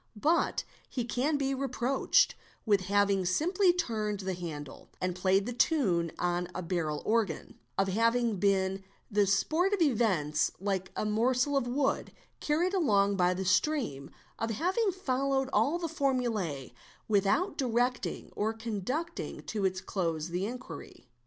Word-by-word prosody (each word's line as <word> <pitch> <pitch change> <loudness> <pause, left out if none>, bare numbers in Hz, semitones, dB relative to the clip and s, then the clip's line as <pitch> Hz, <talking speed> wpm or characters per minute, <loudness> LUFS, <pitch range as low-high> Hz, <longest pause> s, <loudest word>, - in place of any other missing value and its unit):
But 325 +8 +2 0.3
he 245 -3 -2
can 270 +5 0
be 275 -1 0
reproached 265 0 +2 0.3
with 205 -3 +3
having 200 -1 +3
simply 355 - +3
turned 215 - -2
the 190 0 -2
handle 155 -6 -7
and 185 0 -1
played 190 +2 +2
the 245 - -3
tune 195 - +2
on 175 0 0
a 185 - -3
barrel 165 -4 -2
organ, 215 -8 -1 0.2
of 195 - +2
having 230 +2 +2
been 195 0 +1 0.3
the 205 -1 +3
sport 315 - +2
of 400 - 0
events 190 - +1
like 190 -1 -2
a - - -1
morsel 250 +6 +1
of 270 -3 +1
wood 270 +3 0 0.3
carried 335 +5 +1
along 205 - +3
by 180 -1 +2
the 190 +1 -3
stream, 185 - +1 0.3
of 225 - -1
having 370 - +1
followed 270 -6 -1
all 310 +5 +3
the 345 -1 -3
formule 240 - -1 0.4
without 210 - +2
directing 245 -1 -1
or 220 +2 0
conducting 230 - -4
to 210 -3 -2
its 185 0 0
close 165 -4 -2
the 180 +3 -1
inquiry. 250 +2 -9
220 Hz, 145 wpm, -30 LUFS, 190-275 Hz, 0.4 s, with